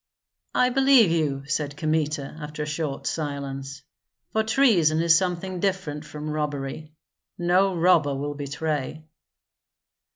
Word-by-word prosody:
"I 250 - +4
believe 265 -6 +5
you," 145 -5 0
said 145 0 -2
Kmita, 155 -2 -1
after 150 0 -5
a - - -3
short 150 -2 -4
silence, 140 -2 -4 0.5
"for 220 - +2
treason 215 - +3
is 165 0 +5
something 180 +1 -1
different 175 -6 -2
from 150 0 -6
robbery; 150 0 -4 0.4
no 180 +2 +2
robber 165 -5 +3
will 145 +2 -3
betray." 150 +1 -3
155 Hz, 120 wpm, -25 LUFS, 145-180 Hz, 0.5 s, believe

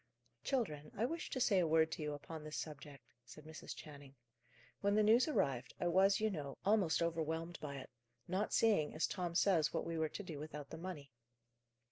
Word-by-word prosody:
"Children, 155 - -1
I 220 - +2
wish 330 +5 -3
to 260 - -2
say 205 -6 +4
a 175 - +3
word 160 0 +4
to - - -4
you 150 -1 -2
upon 155 +2 -8
this 155 0 -5
subject," 145 -2 -7 0.2
said 135 +5 -13
Mrs. 160 0 -8
Channing. 140 -2 -11 0.6
"When 200 0 +2
the 215 - +5
news 230 +6 +5
arrived, 135 - 0
I - - -1
was, 195 +3 +5
you 215 0 +1
know, 145 -6 -5
almost 195 -5 +3
overwhelmed 165 +1 -2
by 140 -2 -5
it; 135 - -8 0.4
not 190 +4 -1
seeing, 205 -11 +3
as 155 - +2
Tom 175 -3 -3
says, 170 -5 +3
what - - 0
we 165 -1 -2
were 160 -1 +1
to 205 - -6
do 165 -6 -6
without 150 -1 -7
the 160 - -6
money. 165 -6 -7
160 Hz, 200 wpm, -37 LUFS, 150-195 Hz, 0.6 s, the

